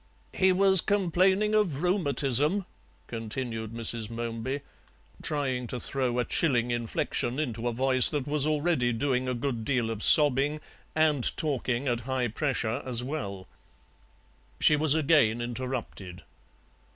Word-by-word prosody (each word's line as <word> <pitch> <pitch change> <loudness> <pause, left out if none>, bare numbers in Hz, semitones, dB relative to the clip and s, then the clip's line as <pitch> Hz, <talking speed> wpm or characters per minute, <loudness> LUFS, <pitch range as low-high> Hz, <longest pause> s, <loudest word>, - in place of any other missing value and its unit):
"He 190 0 +3
was 190 -1 +4
complaining 195 +1 +1
of 180 -9 0
rheumatism," 150 - +2 0.4
continued 115 -1 -5
Mrs. 115 -1 -1
Momeby, 115 +4 -4 0.6
trying 130 -4 -2
to 125 - -5
throw 125 -1 -2
a 125 - 0
chilling 120 -6 +1
inflection 120 +1 -2
into 120 -5 -3
a - - 0
voice 130 +1 +4
that 145 -3 -3
was 150 0 0
already 150 -5 0
doing 130 +1 -1
a 125 - -2
good 120 -2 -3
deal 120 -2 -1
of 110 -2 -6
sobbing 145 +2 +5 0.4
and 155 -5 +2
talking 135 -4 -2
at 120 -2 0
high 130 -2 -1
pressure 120 -2 -2
as 125 -2 0
well. 100 -10 -6 1.1
She 150 - +5
was 150 0 +2
again 140 -8 +2
interrupted. 120 -7 -5
130 Hz, 130 wpm, -27 LUFS, 120-150 Hz, 1.1 s, sobbing